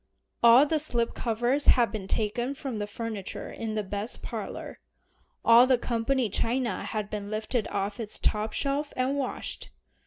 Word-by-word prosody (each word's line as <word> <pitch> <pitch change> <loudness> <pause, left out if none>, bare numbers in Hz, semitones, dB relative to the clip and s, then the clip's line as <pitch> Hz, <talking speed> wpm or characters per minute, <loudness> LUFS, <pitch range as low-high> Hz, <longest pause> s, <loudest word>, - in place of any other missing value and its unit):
All 235 +4 +8
the 310 +1 +1
slip 240 -6 0
covers 240 +5 0
had 240 -3 +5
been 205 -4 -5
taken 240 +6 -1
from 260 -6 -3
the 205 - -3
furniture 215 -2 -5
in 220 -1 -4
the 215 - -1
best 205 +3 -5
parlor. - - -6 0.7
All 235 +2 +8
the 255 -1 +4
company 240 +1 0
china 230 +1 -1
had 215 -2 -3
been 205 -1 -4
lifted 215 +2 -2
off 200 +1 -3
its 215 -2 -2
top 215 +1 0
shelf 285 +4 -1
and 255 +2 +1
washed. 275 -3 -4
230 Hz, 160 wpm, -28 LUFS, 215-255 Hz, 0.7 s, All